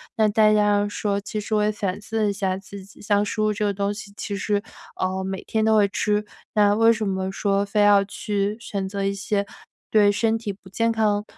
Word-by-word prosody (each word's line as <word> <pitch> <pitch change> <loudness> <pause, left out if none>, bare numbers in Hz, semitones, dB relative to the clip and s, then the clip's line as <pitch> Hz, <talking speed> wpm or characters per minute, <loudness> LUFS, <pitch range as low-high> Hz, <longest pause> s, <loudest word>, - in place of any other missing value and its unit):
那 220 -3 +3
大 215 0 +4
家 205 -1 +3
说 205 -1 -1
其 210 +1 -5
实 210 +1 -5
我 210 -1 +3
也 210 - +2
反 200 -2 -3
思 220 +1 -2
了 205 - +2
一 - - -1
下 190 -2 -1
自 195 0 -10
己， 200 +2 -17
像 205 -1 +2
食 210 - -4
物 215 0 +2
这 210 +1 -3
个 205 - +1
东 200 +1 -1
西， 205 -1 -10
其 205 - -4
实， 205 0 0 0.4
呃， 190 0 -1
每 190 0 -4
天 220 -1 -1
都 220 0 +4
会 205 -2 +5
吃， 210 +1 0 0.3
那 205 -1 +4
为 225 +2 +5
什 215 -1 -2
么 190 0 -2
说 200 0 0
非 205 +1 0
要 205 -1 +6
去 205 0 -2
选 200 -4 -4
择 200 0 -3
一 195 0 0
些， 200 +1 -1 0.5
对 205 -2 +5
身 220 +2 +1
体 220 -2 -4
不 190 -1 -17
健 230 +4 +1
康， 210 -2 +1
205 Hz, 255 characters per minute, -23 LUFS, 200-215 Hz, 0.5 s, 要